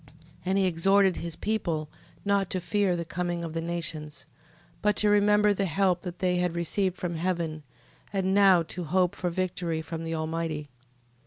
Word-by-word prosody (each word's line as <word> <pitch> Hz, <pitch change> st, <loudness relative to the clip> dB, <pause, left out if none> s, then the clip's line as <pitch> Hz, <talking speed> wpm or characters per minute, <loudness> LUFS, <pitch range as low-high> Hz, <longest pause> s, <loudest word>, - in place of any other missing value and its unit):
15:8. -, -, -22 dB, 0.3 s
And 190 Hz, +2 st, +1 dB
he 195 Hz, -, +3 dB
exhorted 190 Hz, +2 st, +3 dB
his 170 Hz, -1 st, -4 dB
people 170 Hz, -8 st, -1 dB, 0.4 s
not 200 Hz, -2 st, +2 dB
to 185 Hz, -, -1 dB
fear 190 Hz, 0 st, +1 dB
the 170 Hz, -1 st, -3 dB
coming 175 Hz, 0 st, -3 dB
of 165 Hz, -2 st, -5 dB
the 165 Hz, -, -2 dB
nations, 155 Hz, -4 st, -5 dB, 0.6 s
but 210 Hz, 0 st, +2 dB
to 210 Hz, 0 st, +3 dB
remember 210 Hz, 0 st, +4 dB
the 195 Hz, 0 st, 0 dB
help 180 Hz, +1 st, +1 dB
they 180 Hz, 0 st, -1 dB
had 180 Hz, 0 st, +1 dB
before -, -, -5 dB
received 185 Hz, +2 st, 0 dB
from 170 Hz, -2 st, -3 dB
heaven, 170 Hz, -3 st, -2 dB, 0.5 s
and 190 Hz, -1 st, 0 dB
now 195 Hz, -4 st, +6 dB
to 170 Hz, +2 st, -6 dB
hope 180 Hz, +2 st, +2 dB
for 180 Hz, -, -2 dB
victory 175 Hz, -2 st, -2 dB
from 165 Hz, +1 st, -5 dB
the 165 Hz, 0 st, -3 dB
Almighty. 160 Hz, -2 st, -3 dB
180 Hz, 180 wpm, -27 LUFS, 165-195 Hz, 0.6 s, now